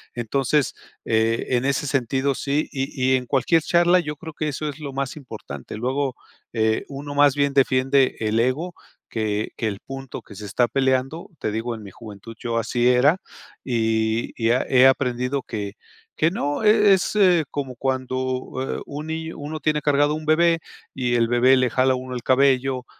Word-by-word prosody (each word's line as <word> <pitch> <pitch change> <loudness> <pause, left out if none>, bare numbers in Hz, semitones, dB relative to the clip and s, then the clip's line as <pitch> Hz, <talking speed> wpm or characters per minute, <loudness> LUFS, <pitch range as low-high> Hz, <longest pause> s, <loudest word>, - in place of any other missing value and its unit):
Entonces, 135 +4 0 0.3
eh, 115 +1 +1
en 125 0 +1
ese 140 +1 0
sentido 135 +1 0
sí 145 +4 -1
y 135 -1 -1
y - - +6
en 125 - -5
cualquier 140 +6 +2
charla 175 +2 +4
yo 150 -3 -4
creo 160 +2 -9
que 155 - -3
eso 150 +1 -3
es 145 +1 -8
lo 145 -3 -6
más 135 +1 -3
importante. 105 - -9
Luego, 130 +3 -1 0.4
eh, 110 -1 +1
uno 145 +1 -7
más 145 -1 +5
bien 140 -1 +1
defiende 135 0 +3
el 110 0 0
ego 140 +9 0 0.4
que 110 -1 -2
que 115 - -1
el 100 -2 -4
punto 135 -1 -8
que 105 - -14
se 105 - -8
está 115 +4 +1
peleando, 135 +4 0
te 110 - -3
digo 115 +2 -3
en 110 - -10
mi 100 - -10
juventud, 110 +1 -11
yo 115 -1 -2
así 120 +1 +1
era 125 +7 +4 0.4
y 110 -2 0
y 115 +1 +3
he 125 - +1 0.2
he - - +9
aprendido 125 0 0
que 100 -3 -5 0.4
que 160 - +2
no, 145 -5 -2
e 210 -1 +6
es 190 - 0 0.4
como 135 -3 -4
cuando 130 0 -2 0.7
un, 150 +2 -7
eh, - - -1
niño 160 +1 -5
uno 150 +2 -5
tiene 150 -1 0
cargado 145 0 +2
un 155 0 -5
bebé 165 +2 +3 0.3
y 125 -2 -1
el 115 -1 +3
bebé 125 +2 +4
le 130 -1 +2
jala 130 0 +3
a - - 0
uno 130 0 -6
el 125 - -4
cabello 130 -1 +2
130 Hz, 190 wpm, -23 LUFS, 120-145 Hz, 0.7 s, he